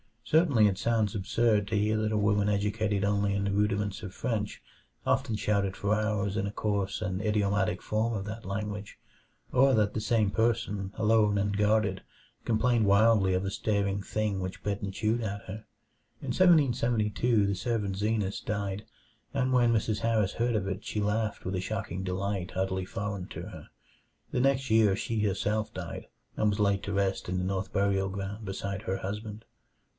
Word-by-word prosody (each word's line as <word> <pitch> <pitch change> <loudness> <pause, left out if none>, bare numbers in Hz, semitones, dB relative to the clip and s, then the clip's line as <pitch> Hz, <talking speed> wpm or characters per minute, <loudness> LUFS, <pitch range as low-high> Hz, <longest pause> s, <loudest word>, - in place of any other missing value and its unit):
Certainly 145 -10 +4
it 95 -2 0
sounds 110 -3 +1
absurd 105 +1 +1
to 105 +1 0
hear 105 +1 +2
that 110 0 0
a - - +2
woman 105 0 +2
educated 105 0 0
only 100 0 +1
in 100 - 0
the 100 - 0
rudiments 105 0 0
of 95 -2 -7
French 110 -5 -2 0.4
often 130 -5 +1
shouted 100 -2 0
for 100 +1 0
hours 105 -1 0
in 100 - 0
a - - -4
coarse 100 -1 -1
and 95 -2 -2
idiomatic 105 -2 +1
form 110 +2 0
of 100 -3 -2
that 110 +2 -7
language, 105 +1 -4 0.5
or 135 +1 +5
that 105 -3 +2
the - - -1
same 110 -2 +1
person, 110 -4 0
alone 105 -1 +3
and 100 0 0
guarded, 105 -2 +2 0.4
complained 115 0 +2
wildly 100 -1 +4
of 90 +1 0
a 100 - -2
staring 100 -1 0
thing 105 -1 -2
which 95 0 -5
bit 100 -1 -2
and 100 -1 -4
chewed 110 +3 0
at 100 -2 -3
her. 105 +3 -8 0.6
In - - -5
1772 120 - +3
the 100 - 0
servant 100 -1 -2
Zenas 105 -1 0
died, 100 -1 -3 0.5
and 130 -1 +1
when 120 -2 +4
Mrs. 110 -1 0
Harris 110 -4 +1
heard 120 0 +1
of 100 -3 0
it 95 +1 -4
she 105 - -2
laughed 105 +1 -1
with 95 +1 -2
a 90 - -1
shocking 100 -2 -4
delight 95 0 -2
utterly 95 0 -1
foreign 100 -2 -4
to - - -7
her. - - -10 0.6
The - - 0
next 135 -1 +1
year 110 -3 +5
she 115 +2 -2
herself 105 +1 0
died, - - -6 0.3
and 110 - +3
was 105 +1 -1
laid 100 -1 +2
to 100 - -3
rest 100 -1 0
in 90 +1 -1
the 90 - -1
North 95 0 -2
Burial 100 -1 +1
Ground 100 +2 -5
beside 100 +1 -4
her 95 -4 -1
husband. 105 +3 -6
105 Hz, 180 wpm, -29 LUFS, 100-110 Hz, 0.6 s, or